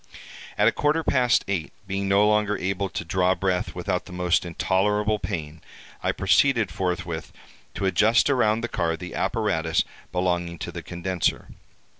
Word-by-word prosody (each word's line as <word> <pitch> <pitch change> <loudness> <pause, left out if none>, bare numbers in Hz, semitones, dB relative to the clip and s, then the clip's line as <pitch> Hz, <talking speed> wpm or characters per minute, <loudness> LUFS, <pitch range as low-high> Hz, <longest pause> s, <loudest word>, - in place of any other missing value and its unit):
"At - - +4
a - - +5
quarter 150 +2 +1
past 125 -4 +2
eight, 95 -5 -2
being 95 0 -2
no 100 +2 +4
longer 105 0 +2
able 95 +1 -2
to 85 - -5
draw 90 +2 +2
breath 95 -1 -1
without 90 0 -2
the - - -12
most 90 -1 +1
intolerable 105 +5 +1
pain, 80 -6 -5 0.4
I - - +1
proceeded 120 -8 +3
forthwith 90 -3 -3 0.4
to 100 - -2
adjust 110 +5 +4
around 115 -5 +2
the 120 - -2
car 85 -6 -1
the 90 +2 -8
apparatus 95 -8 0 0.3
belonging 90 -1 -1
to 85 - -6
the 85 0 -6
condenser. 85 +1 -2
95 Hz, 155 wpm, -25 LUFS, 85-105 Hz, 0.4 s, a